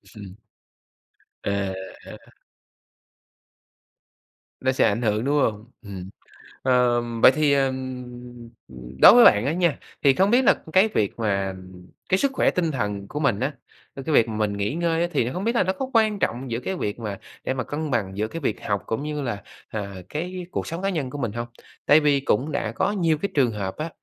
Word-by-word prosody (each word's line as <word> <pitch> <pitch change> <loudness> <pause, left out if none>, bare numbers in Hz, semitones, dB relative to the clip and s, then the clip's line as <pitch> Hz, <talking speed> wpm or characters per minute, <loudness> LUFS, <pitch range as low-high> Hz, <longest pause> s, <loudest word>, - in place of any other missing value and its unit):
Ừm. 100 -3 -10 1.1
À, 100 -1 -1 0.3
à! - - -9 2.4
Nó 130 - +2
sẽ 130 - +2
ảnh 105 +3 -1
hưởng, 110 -1 0
đúng 145 +2 +1
hông? 110 +1 -2
Ừm. 95 -4 -8 0.5
Ờ, 125 -2 +3 0.2
vậy - - +9
thì, 150 -2 +3
ờm, 130 -2 -1 0.6
ờm, 65 - -13 0.2
đối - - +11
với 245 - +8
bạn 105 +3 +6
á 145 - +1
nha, 170 -3 +1 0.2
thì 140 - +6
không 190 +8 +2
biết 250 +2 +4
là - - +6 0.2
cái 190 +3 +6
việc 110 - -1
mà 100 -3 -1 0.5
cái 185 - +4
sức 275 +6 +1
khỏe - - +2
tinh 170 -3 0
thần 105 -6 -3
của 150 - -5
mình 130 -9 +1
á, 135 +4 -1 0.4
cái 135 - -7
việc 115 - +5
mình 105 -2 -1
nghỉ 100 +4 -1
ngơi 170 -1 0
á, 175 - +2
thì 125 -7 0
không 185 - -4
biết 230 +3 0
là - - +4
nó 185 +1 0
có 260 +7 -5
quan 215 -3 +3
trọng 125 -4 -2
giữa 115 - -1
cái 190 +9 -4
việc 105 - -3
mà 105 -4 -5 0.2
để - - -1
mà 130 -1 -3
cân 150 +4 -4
bằng 100 -6 -1
giữa 105 +1 0
cái 165 - -6
việc 130 -8 -2
học 100 -1 -1
cũng 115 +5 -3
như 150 -1 -3
là, 120 -7 -4 0.3
à, 100 -2 -5
cái 180 +4 -5
cuộc - - -3
sống 165 +2 -5
cá 195 - 0
nhân 155 -9 -2
của 145 - -7
mình 120 -6 -2
hông? 120 +2 -5 0.4
Tại 150 - +6
vì 145 -2 +3
cũng 135 +2 0
đã 115 -6 -2
có 190 - 0
nhiều 170 -6 +1
cái 200 +6 -3
trường 130 -5 +3
hợp 100 -3 -4
á, 155 +2 -3
130 Hz, 205 wpm, -24 LUFS, 105-165 Hz, 2.4 s, đối